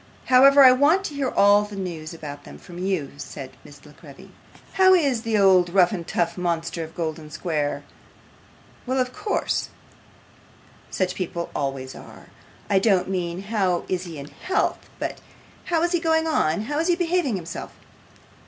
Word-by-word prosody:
'However, 275 +2 +7
I 260 - +9
want 295 +9 +3
to 305 - -5
hear 280 -2 -1
all 205 -1 +5
the 210 0 -7
news 170 -5 -5
about 145 -3 -9
them - - -12
from 175 0 -12
you,' 185 -6 -2
said 135 -2 -8
Miss 145 0 -16
La 150 - -14
Creevy. 140 -1 -15 0.4
'How 375 0 +6
is 275 -9 +1
the 225 -2 0
old 190 -3 +5
rough 180 -1 +4
and 175 -5 -5
tough 170 0 -1
monster 170 -1 -2
of 160 0 -11
Golden 160 -2 -4
Square? 150 -3 -2 1.0
Well, 260 +1 0
of 255 -1 0
course; 420 0 -2 1.2
such 185 -1 -1
people 170 -2 -4
always 135 -2 -3
are. - - -13 0.4
I 195 - +3
don't 190 -3 +2
mean 180 0 -3
how 195 -4 0
is 185 0 -2
he 165 -3 -8
in 140 +1 -8
health, 380 +2 -1 0.2
but - - -5 0.4
how 335 -2 0
is 345 - +1
he 350 - +2
going 320 -1 +1
on: 205 - +1
how 290 +7 -3
is 330 - 0
he 350 - +3
behaving 345 - 0
himself? 170 -3 -6
190 Hz, 170 wpm, -23 LUFS, 165-265 Hz, 1.2 s, I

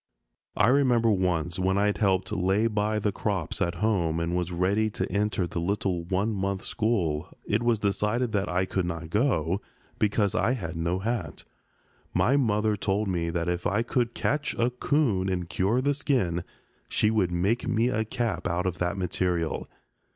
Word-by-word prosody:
I 105 +3 +5
remember 125 -4 +4
once, 90 -3 0
when 95 +1 +1
I 100 - +3
had 105 - 0
helped 95 -2 +1
"lay 95 +2 +1
by" 105 -1 0
the 105 0 0
crops 95 -5 -2
at 85 0 0
home 85 -7 +1
and 85 +1 -1
was 90 0 -1
ready 100 +5 +1
to - - -3
enter 100 -1 0
the 85 - -4
little 90 -1 -1
one 95 +5 0
month 95 0 -2
school, 90 -9 0 0.2
it 105 +2 +1
was 120 -1 +2
decided 105 +4 0
that 100 -1 0
I 90 +1 +1
could 95 -1 -1
not 85 -1 -5
go, 100 - +1 0.4
because 105 -1 +2
I 125 - +2
had 85 -10 -4
no 85 +2 0
hat. 115 +5 -3 0.7
My 105 +10 +3
mother 110 -5 +2
told 100 +1 -1
me 85 -2 -1
that 85 0 -2
if 90 0 -1
I 105 +3 +1
could 120 0 -1
catch 145 0 -1
a 120 +2 +1
'coon 125 -7 +1
and 90 -2 -2
cure 100 +8 +1
the 145 +2 +2
skin, 120 - 0 0.5
she 105 - +2
would 100 -5 +1
make 100 +8 0
me 120 0 +2
a 110 -3 0
cap 110 -3 -2
out 90 +1 -1
of 90 -1 -2
that 90 +3 -1
material. 90 -3 -1
100 Hz, 180 wpm, -27 LUFS, 90-110 Hz, 0.7 s, I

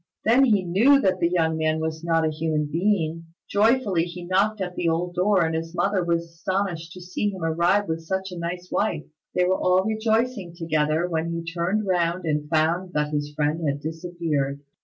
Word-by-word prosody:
Then 245 +5 +5
he 210 -6 +3
knew 225 +11 +5
that 185 -7 +1
the 170 - +2
young 160 -2 +1
man 155 0 +1
was 160 0 -3
not 165 -1 +2
a 155 - +1
human 155 -1 -1
being. 165 0 -1 0.2
Joyfully 205 -5 +2
he 175 0 -8
knocked 200 +4 +1
at 180 -2 -3
the 170 - 0
old 175 +2 -1
door, 185 0 +3
and 160 - -1
his 165 +1 -4
mother 195 -1 +1
was 170 -1 0
astonished 170 0 -3
to 185 - -10
see 180 +3 -2
him 190 -4 -6
arrive 170 +5 +2
with 165 0 -2
such 190 +3 -3
a 180 - -6
nice 175 +1 -4
wife. 175 -8 0 0.3
They 180 - +3
were 185 +1 +1
all 185 +1 +3
rejoicing 220 -3 0
together, 155 0 0
when 165 -1 -2
he 170 0 -3
turned 175 +5 -1
round 175 -1 0
and 150 -1 -1
found 170 +4 +1
that 150 0 -1
his 145 0 -2
friend 150 +2 0
had 140 0 -1
disappeared. 160 -3 -3
170 Hz, 200 wpm, -24 LUFS, 160-190 Hz, 0.3 s, Then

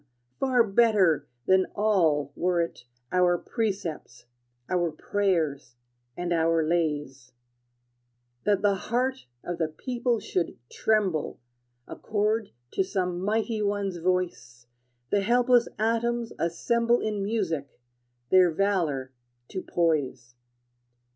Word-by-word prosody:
Far 255 -3 +4
better 205 -6 +3 0.2
than 190 0 +4
all 165 -10 +2
were 180 0 +1
it 165 -7 -3 0.3
Our 180 -1 +3
precepts, 195 - -4 0.4
our 175 -2 0
prayers, 155 -8 -1 0.4
and 175 0 -1
our 165 0 +2
lays 150 -6 -2 1.1
That 205 -1 +2
the 205 -1 +4
heart 250 - -2 0.2
of 175 -1 -4
the 160 - +1
people 240 +8 -2
should 180 -4 -2
tremble 200 -8 0 0.5
Accord 215 0 -1 0.2
to - - +1
some 180 -2 -2
mighty 220 +2 0
one's 200 -3 -1
voice, 170 -9 -2 0.5
The 205 - +3
helpless 245 +3 +4
atoms 230 +1 0
assemble 235 +8 +1
In 210 -2 -2
music, 175 - -2 0.5
their 185 -1 +6
valor 160 -8 0 0.4
to 185 - -4
poise. 140 -10 -1
185 Hz, 105 wpm, -27 LUFS, 165-215 Hz, 1.1 s, their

